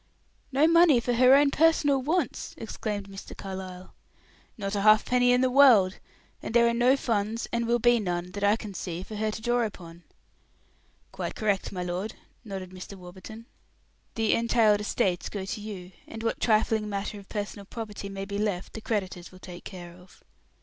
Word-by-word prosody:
"No 280 +4 +4
money 335 -5 +6
for 245 +1 -1
her 255 +2 +6
own 285 0 +4
personal 290 -4 +3
wants!" 310 0 -2
exclaimed 210 -2 -5
Mr. 195 0 -10
Carlyle. 185 -1 -8 0.6
"Not 195 -2 -4
a 200 - 0
halfpenny 245 +4 +4
in 250 0 +4
the 260 - +3
world. 240 -9 +6 0.4
And 230 - -6
there 235 0 +6
are 235 - +2
no 245 +3 +4
funds, 225 -2 -1
and 235 0 0
will 240 +1 +3
be 240 0 +4
none, 180 -3 -3
that 205 +2 -6
I 205 +1 +4
can 215 -3 -8
see, 175 -1 -5
for 215 - -8
her 215 +1 0
to 215 - -5
draw 240 0 +2
upon." 175 -6 -7 1.1
"Quite - - -5
correct, 205 -3 -1
my 180 -2 -4
lord," 180 +5 -4 0.3
nodded 190 -4 -7
Mr. 185 +2 -9
Warburton. 190 +5 -11 0.7
"The 225 -1 +2
entailed 230 -3 +3
estates 185 -3 -1
go 195 -2 -5
to 210 +2 -5
you, 195 -4 -8 0.2
and 225 0 -8
what 230 - -1
trifling 215 -1 +2
matter 200 +1 -4
of 195 - -16
personal 205 -1 -5
property 210 -2 -7
may 195 0 -5
be 200 0 -4
left 200 -4 -2
the 220 - -7
creditors 190 -6 -3
will 185 - -14
take 180 -1 -11
care 175 -3 -9
of." 180 +1 -19
210 Hz, 185 wpm, -27 LUFS, 190-235 Hz, 1.1 s, money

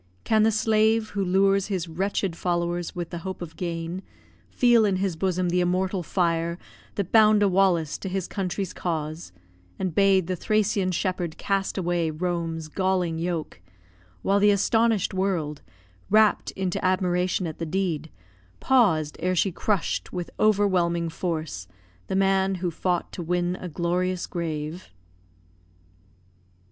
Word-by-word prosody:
Can 220 -1 +3
the 220 - +5
slave, 220 0 +2
who 200 -1 -1
lures 195 +1 +3
His 185 -4 -2
wretched 185 +1 -2
followers 175 0 -2
with 175 -1 -5
the 170 - -4
hope 190 +2 -6
of 165 -2 -8
gain, 170 +1 -4 0.5
Feel 240 - +4
in 200 -2 +2
his 185 -2 -1
bosom 180 +1 0
the 180 +1 +2
immortal 185 +2 0
fire 170 -1 0 0.4
That 200 -4 -3
bound 215 -2 +6
a - - +5
Wallace 180 -5 +2
to 195 - -5
his 190 -1 -2
country's 190 -1 -3
cause, 160 - -4 0.5
And 185 -3 -2
bade 195 -1 +4
the 185 +2 -2
Thracian 205 -1 +1
shepherd 180 -2 -2
cast 195 0 -1
away 175 -3 0
Rome's 165 -1 -3
galling 180 -1 0
yoke; 165 - -3 0.6
while 200 +1 +3
the 205 +1 +5
astonish'd 220 +1 +2
world 180 -6 -1 0.5
Rapt 215 0 +4
into 190 -2 -2
admiration 185 0 +1
at 160 -2 -6
the 165 - -2
deed 160 -3 -1 0.5
Paus'd, 180 - +2
ere 185 0 0
she 185 +3 +2
crush'd, 195 +1 -1
with 175 -1 -5
overwhelming 185 -5 +2
force, 160 - -4 0.4
The - - -2
man 195 0 +2
who 180 -1 -2
fought 175 +1 -1
to - - -6
win 175 +1 0
a 180 - -5
glorious 180 +2 -1
grave? 160 0 -4
180 Hz, 145 wpm, -25 LUFS, 170-195 Hz, 0.6 s, bound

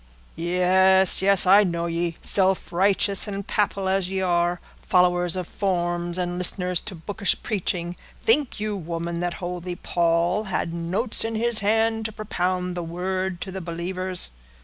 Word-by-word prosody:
"Yes, 185 +2 +3
yes, 195 -1 +5
I 200 +3 +7
know 170 -3 -2
ye, 170 0 -2
self 190 -2 +2
righteous 195 +2 +2
and 200 -1 -5
papal 200 -2 -1
as 190 -1 0
ye 190 0 -2
are—followers 175 0 +1
of 185 -1 -3
forms, 175 -2 -2
and 175 -1 -2
listeners 180 -1 +2
to 205 - -7
bookish 200 +5 0
preaching; 180 -5 -2 0.2
think 255 +2 +1
you, 210 0 -2
woman, 170 -1 -4
that 175 0 -2
holy 180 0 -5
Paul 175 +4 0
had 180 -3 -2
notes 180 +8 0
in 225 0 -3
his 230 0 +2
hand 220 +2 +1
to 220 - -2
propound 180 -3 -2
the 175 - -3
Word 185 +2 -3
to 190 - -5
the 190 0 -6
believers?" 180 - -3
185 Hz, 150 wpm, -24 LUFS, 175-195 Hz, 0.2 s, I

